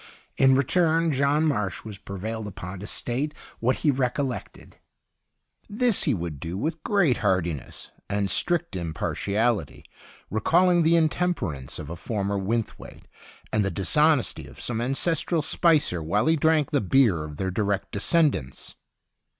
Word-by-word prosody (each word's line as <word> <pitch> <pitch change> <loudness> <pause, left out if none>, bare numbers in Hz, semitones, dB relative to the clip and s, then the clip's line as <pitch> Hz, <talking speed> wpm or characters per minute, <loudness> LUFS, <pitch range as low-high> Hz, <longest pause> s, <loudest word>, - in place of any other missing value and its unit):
In 135 0 +5
return, 165 +4 +2
John 140 +3 +2
Marsh 105 - -1
was 105 -3 -7
prevailed 105 +3 -5
upon 95 -1 -7
to 100 - -7
state 135 +8 -2 0.2
what 125 +3 +2
he 150 - +6
recollected; 130 0 -3 0.9
this 225 0 +1
he 145 - +2
would 85 -5 -5
do 85 +5 -5
with 155 +9 -3
great 175 - +2
heartiness 90 - -2 0.2
and 100 -1 0
strict 175 - 0
im 85 -3 -4
partiality, 105 - -1 0.5
recalling 175 - +3
the 165 +1 +4
intemper 165 - +1
ance 65 -1 -7
of 75 +1 -7
a - - -4
former 100 +1 -2
Wynthwaite 110 +3 -4 0.5
and 110 -1 +2
the 95 - 0
dishonesty 145 - +1
of - - -14
some 115 -1 -3
ancestral 155 +5 0
Spicer 150 - +2
while 85 +9 0
he 160 - +4
drank 155 -1 +2
the 145 -3 +2
beer 100 - +3
of 75 -1 -8
their 95 +2 -2
direct 100 +1 -1
descendants. 130 - 0
120 Hz, 145 wpm, -25 LUFS, 95-155 Hz, 0.9 s, he